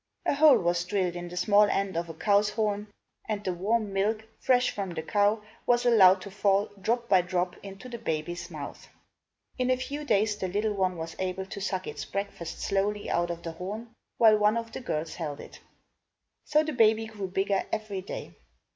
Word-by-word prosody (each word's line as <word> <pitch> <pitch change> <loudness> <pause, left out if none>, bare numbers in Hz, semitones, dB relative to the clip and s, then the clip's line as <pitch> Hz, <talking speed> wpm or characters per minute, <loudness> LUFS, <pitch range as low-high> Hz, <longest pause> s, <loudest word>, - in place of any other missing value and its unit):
A - - +2
hole 290 -2 +7
was 175 -3 +1
drilled 180 -1 -1
in 175 0 -5
the 180 - -8
small 205 +3 +5
end 195 -2 -1
of 170 0 -2
a 165 - -7
cow's 205 +4 +3
horn 210 -1 -1 0.4
and 210 -1 -2
the 185 - -1
warm 205 +3 0
milk, 215 +3 0 0.2
fresh 250 -1 +3
from 195 -2 -4
the 165 -2 -5
cow, 205 +2 +2 0.2
was 245 0 +3
allowed 195 -6 +6
to 200 - -8
fall, 200 0 +1
drop 235 +3 0
by 190 -4 +5
drop, 180 0 -1
into 195 +5 -9
the 240 -2 -7
baby's 170 -2 -3
mouth. 150 -4 -8 0.7
In 255 0 +1
a 255 - +3
few 285 +3 -5
days 210 -5 +2
the 190 - -2
little 210 +3 0
one 185 -3 0
was 165 0 -6
able 190 0 -2
to 200 +1 -7
suck 185 -1 -2
its - - -5
breakfast 195 -4 -5
slowly 205 +1 -1
out 175 0 +1
of 170 0 -5
the 165 - -4
horn, 205 +7 -6 0.3
while 220 -2 +6
one 210 +2 +3
of 230 0 -4
the - - -6
girls 160 -9 -3
held 150 -4 -5
it. - - -11 0.9
So 305 +1 +3
the 310 0 -3
baby 225 -2 +4
grew 210 -3 -6
bigger 195 +1 0
every 210 -3 -3
day. 190 - -7
200 Hz, 200 wpm, -28 LUFS, 180-220 Hz, 0.9 s, hole